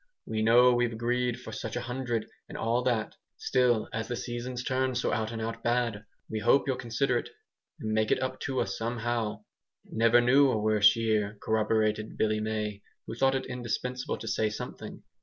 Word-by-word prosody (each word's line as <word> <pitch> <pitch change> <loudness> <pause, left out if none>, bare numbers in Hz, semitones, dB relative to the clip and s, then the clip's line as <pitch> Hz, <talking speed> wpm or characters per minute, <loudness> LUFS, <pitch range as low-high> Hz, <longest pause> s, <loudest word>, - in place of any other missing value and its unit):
We 110 0 -2
know 120 +3 +6
we've 120 -1 +1
agreed 120 +1 -1
for - - -9
so - - -4
much 110 - -7
a 120 - -2
hundred, 125 -2 -2 0.2
and - - -7
all 115 +2 +1
that. 115 -4 0 0.2
Still 120 -4 +2
as 115 +1 -2
the 120 - -2
season's 120 +1 -4
turned 130 -1 0
so 125 - 0
out 110 0 -1
and 115 - -5
out 115 +1 -4
bad, 120 -3 0 0.2
we 110 - -3
hope 135 +6 +4
you'll 135 -2 0
consider 120 +1 0
it - - -8 0.5
and 110 - -3
make 110 0 +2
it - - +2
up 130 - -3
to 130 -1 -1
us - - -2
somehow." 115 -2 -2 0.4
"Never 115 +2 +4
knew 135 +3 +5
a 120 - +1
worse 105 -1 +5
year," 110 -2 0
corroborated 110 0 0
Billy 110 0 +1
May, 105 -1 -3 0.2
who - - -6
thought 135 +3 +2
it 135 - -2
indispensable 125 0 -3
to 115 - -8
say 110 0 +1
something. 105 - -7
115 Hz, 195 wpm, -29 LUFS, 110-125 Hz, 0.5 s, know